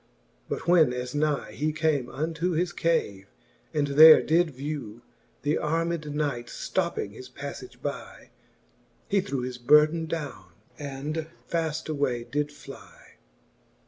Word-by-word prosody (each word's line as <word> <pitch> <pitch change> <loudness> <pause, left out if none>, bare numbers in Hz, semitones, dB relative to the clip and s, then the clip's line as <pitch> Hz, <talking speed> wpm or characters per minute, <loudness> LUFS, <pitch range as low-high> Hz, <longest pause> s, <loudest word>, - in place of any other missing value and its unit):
But - - -4
when 165 -7 +5
as 125 0 -4
ny 145 -7 0
He 150 +8 -1
came 155 -5 0
unto 165 +5 -2
his 175 +2 0
cave, 100 -13 0 0.4
and 150 -2 +1
there 155 +3 +9
did 170 +2 +3
vew 135 -5 -6 0.4
The 150 +1 +1
armed 165 -1 -1
knights, 135 -6 -3
fl:opping 170 - -1
his 125 +5 -11
paflage 140 - -9
by, - - -6 0.8
He 200 -3 +2
threw 140 -9 -3
his 125 0 -5
burden 150 +5 +4
downe, 135 - -6 0.3
and 145 +3 -4 0.2
faft: 160 -2 -2
away 140 -6 -1
did 145 +4 -2
fly. 145 - -14
150 Hz, 130 wpm, -27 LUFS, 130-160 Hz, 0.8 s, there